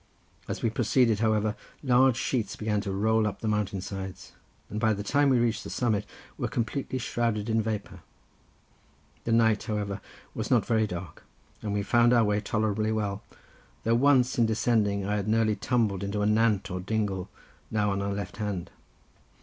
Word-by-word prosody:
As - - -4
we 115 - +2
proceeded, 115 -1 +2
however, 110 -1 +1 0.3
large 130 -1 +4
sheets 120 -6 -1
began 105 -1 -1
to 100 - -4
roll 110 +2 +2
up 105 - -5
the 110 - -2
mountain 105 -3 -1
sides, 95 0 -7 0.4
and 105 - -4
by 110 -1 +3
the 105 0 -4
time 140 +6 +3
we 130 - +4
reached 115 -3 +1
the - - -7
summit 105 -4 0 0.3
we - - -12
were - - +1
completely 130 +3 -2
shrouded 115 -3 -1
in 110 0 +3
vapour. 110 -1 -4 1.3
The 115 - -1
night, 110 -2 +4
however, 105 -3 -3 0.3
was - - -4
not - - +3
very 110 -2 +2
dark, 90 -1 -7 0.4
and 105 - -3
we 100 0 0
found 120 +4 +4
our 120 -2 +5
way 105 -1 +1
tolerably 110 0 0
well, 105 -2 -2 0.6
though 115 - +2
once 130 0 +4
in 115 - +4
descending 110 -3 +1
I 105 +1 0
had 100 0 -3
nearly 110 -1 +2
tumbled 110 -6 0
into 100 +1 -3
the 105 - +1
nant 105 -2 +2
or 90 - -3
dingle, 100 -1 -2 0.4
now 105 -2 +1
on 100 0 -1
our 100 0 -1
left 100 -2 -5
hand. 100 -5 -3
110 Hz, 180 wpm, -28 LUFS, 100-115 Hz, 1.3 s, our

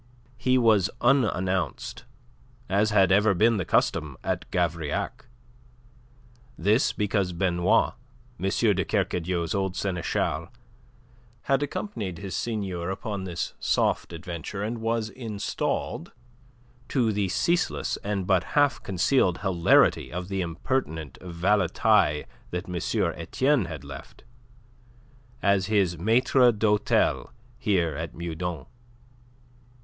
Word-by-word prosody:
He 130 -1 +3
was 110 -6 +4
unannounced, 95 -8 0 0.6
as 100 +3 +2
had 95 -3 +4
ever 100 +1 +4
been 115 +4 +4
the 95 - -2
custom 75 -5 +1
at - - -2
Gavrillac. 85 -4 -2 1.3
This 105 - +3
because 100 -3 -1
Benoit, 90 +4 +2 0.5
M. 95 - 0
de 100 -2 +2
Kercadiou's 85 0 -1
old 95 -2 -1
seneschal, 85 -3 -1 1.0
had 135 0 +1
accompanied 115 - -4
his 95 +1 -5
seigneur 95 -6 -3
upon 95 0 -4
this 85 -2 -4
soft - - +1
adventure, 85 +3 -6
and 115 +2 -3
was 115 -1 -1
installed 105 -6 -3 0.8
to 120 -4 +2
the 100 -2 0
ceaseless 170 - 0
and 100 -2 -3
but 95 -2 +3
half 145 -2 +3
concealed 95 0 +1
hilarity 90 -4 +3
of 90 +1 -5
the 95 -1 -1
impertinent 85 - -3
valetaille 90 -1 +2 0.3
that 90 +1 -4
M. 90 - -5 0.4
Etienne 130 - +1
had 75 -5 -7
left - - -11 1.2
as 100 -2 +3
his 95 -6 +1
maitre 120 +5 +4
d'hotel 105 - +1 0.3
here 90 - +1
at 80 +2 -5
Meudon. 85 -2 -4
95 Hz, 110 wpm, -26 LUFS, 85-110 Hz, 1.3 s, was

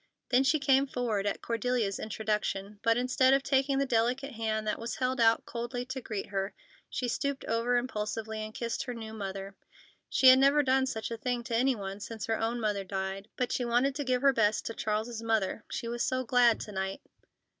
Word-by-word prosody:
Then 255 +1 +4
she 290 +3 +3
came 275 -1 +3
forward 225 -6 -1
at 205 - -2
Cordelia's 230 -3 0
introduction, 210 -2 -2
but, 230 0 +3
instead 255 +1 +4
of 275 - 0
taking 270 0 +2
the 275 - +2
delicate 250 +3 0
hand 220 -2 -2
that 210 - -1
was 230 +1 -4
held 255 -1 0
out 225 0 +4
coldly 240 +1 -4
to 260 +1 -5
greet 210 -4 -4
her, 195 0 -2 0.3
she 250 - -2
stooped 280 +3 -2
over 230 +2 +1
impulsively 220 -2 -3
and 215 0 -5
kissed 230 +3 -3
her 245 -2 -4
new 220 -1 -7
mother. 195 -2 -6 0.5
She 260 - +6
had 260 0 +8
never 280 +2 +5
done 265 0 +2
such 220 -2 -4
a 230 - -3
thing 245 +1 -2
to 235 -2 -3
any 255 +3 +3
one 195 -1 -6
since 220 +1 -6
her 225 -1 -1
own 230 +2 -1
mother 210 -3 -1
died, 190 +1 -4
but 250 -1 -1
she 250 - 0
wanted 245 +3 +2
to 290 +1 -3
give 255 -1 0
her 275 -1 +6
best 215 -3 +2
to 230 - -3
Charles's 220 +2 -2
mother, 225 -2 0
she 235 - -4
was 240 +1 -3
so 255 -3 0
glad 240 -1 +4
to 210 - -7
night. 190 +4 -3
230 Hz, 210 wpm, -30 LUFS, 215-255 Hz, 0.5 s, had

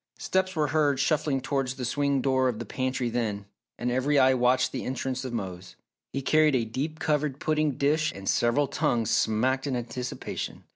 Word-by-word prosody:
Steps 190 0 0
were 150 -2 +1
heard 145 -2 +2
shuffling 145 -1 +1
towards 135 -1 -1
the 130 -2 -4
swing 140 +1 +1
door 130 -1 +2
of 120 - -3
the 120 - -5
pantry 130 +2 -2
then, 110 -4 -2 0.3
and 120 0 -1
every 135 +4 +1
eye 130 -1 +6
watched 125 0 +2
the - - -4
entrance 130 0 -3
of 130 - -5
Mose. 95 -5 -6 0.4
He 135 - -3
carried 155 0 +4
a 120 -3 +1
deep 140 +8 -4
covered 150 -3 0
pudding 155 -2 +1
dish 150 +4 +1
and 95 0 -9
several 120 +5 +2
tongues 115 -4 0
smacked 130 +6 +1
in 135 - -1
anticipation. 125 +1 -5
130 Hz, 185 wpm, -27 LUFS, 120-145 Hz, 0.4 s, eye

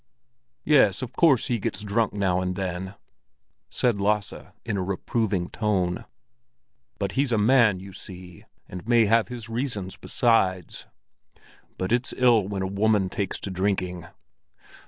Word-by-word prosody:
"Yes, 130 -6 +4
of 125 -1 -6
course 140 -7 +4
he 120 -2 -1
gets 105 - -4
drunk 105 +2 0
now 95 -3 0
and 90 0 -2
then," 95 +1 -4 0.7
said 120 -5 0
Lasse 105 0 0 0.3
in 110 -3 -2
a 95 - -1
reproving 100 0 -1
tone. 95 -5 -1 0.9
"But - - -2
he's 135 -1 0
a 115 - +2
man, 110 -3 +4
you 95 +1 -11
see, 90 -2 -10 0.2
and 90 +4 -9
may 120 -2 +5
have 115 +2 +3
his 120 -4 -8
reasons 115 -5 -4
besides. 95 -7 0 0.9
But 95 +2 -3
it's 120 +1 0
ill 120 -6 +4
when 100 -2 -3
a - - -1
woman 100 0 +1
takes 100 -1 -3
to 100 - -5
drinking." 90 -2 -2
100 Hz, 145 wpm, -25 LUFS, 95-115 Hz, 0.9 s, may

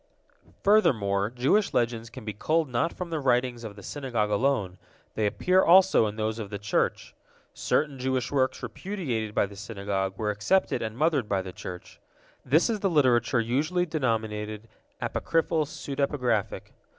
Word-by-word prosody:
Furthermore, 105 - +3
Jewish 135 - +1
legends 115 -1 0
can 120 -1 -10
be 105 - -4
culled 155 - 0
not 125 +6 0
from 180 -2 -7
the 160 - -1
writings 125 -3 +1
of 105 -3 -7
the 100 - -12
Synagogue 120 -5 -2
alone; 105 -5 0 0.3
they 110 -1 0
appear 185 - +2
also 185 - +6
in 105 - -5
those 110 +1 -2
of 105 -3 -5
the 100 - -4
Church. 105 0 -1 0.4
Certain 145 -3 0
Jewish 130 -1 -1
works 130 -2 0
repudiated 125 - -4
by - - +3
the 100 0 -11
Synagogue 100 -2 -3
were 105 -1 0
accepted 110 - +1
and 110 0 -4
mothered 150 -6 +1
by 95 -2 0
the 95 -1 -8
Church. 90 -1 -9 0.4
This 150 +6 +3
is 225 -3 -1
the 195 - +1
literature 130 -6 +3
usually 150 +10 0
denominated 110 -7 -2 0.3
apocryphal 165 -1 0
pseudepigraphic. 135 -7 -2
120 Hz, 155 wpm, -27 LUFS, 105-150 Hz, 0.4 s, also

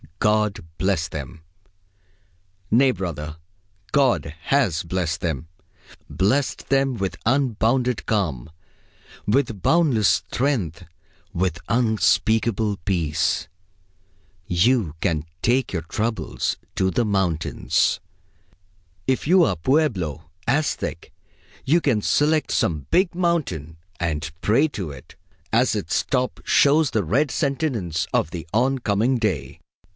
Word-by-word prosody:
God 105 0 +1 0.2
bless 95 -4 0
them! 75 +1 -7 1.3
Nay, 130 +4 +5
brother, 80 - -5 0.5
God 130 - +2
has 125 - +2
blessed 85 -1 -2
them; 80 -2 -2 0.6
blessed 125 +9 0
them 135 -1 +2
with 95 -4 -3
unbounded 125 -1 +1
calm, 80 - -1 0.8
with 115 -3 +1
boundless 140 - +3
strength, 100 - 0 0.5
with 85 -2 -1
unspeakable 110 -2 +2
peace. 80 -6 0 1.0
You 90 - +2
can 80 -5 0 0.2
take 125 0 +1
your 85 - -1
troubles 110 +7 -2 0.2
to 95 - +2
the 120 +6 +1
mountains. 95 -6 +1 1.1
If 130 +1 0
you 180 +2 +6
are 100 - +2
Pueblo, 90 - 0 0.2
Aztec, 145 0 -1 0.5
you 165 +6 +3
can 120 -9 +1
select 150 +7 +2
some 75 -5 0
big 180 0 +3
mountain 140 - -1 0.2
and 75 -3 -2
pray 130 +9 +3
to 95 - -5
it, 65 -2 -13 0.4
as - - +3
its - - 0
top 125 0 -1
shows 145 -1 +4
the 110 -2 +1
red 135 - +1
sentience 120 - -1
of - - +2
the 85 -1 -6
on 130 +5 +2
coming 115 +3 +1
day. 105 - -2
105 Hz, 110 wpm, -23 LUFS, 85-130 Hz, 1.3 s, you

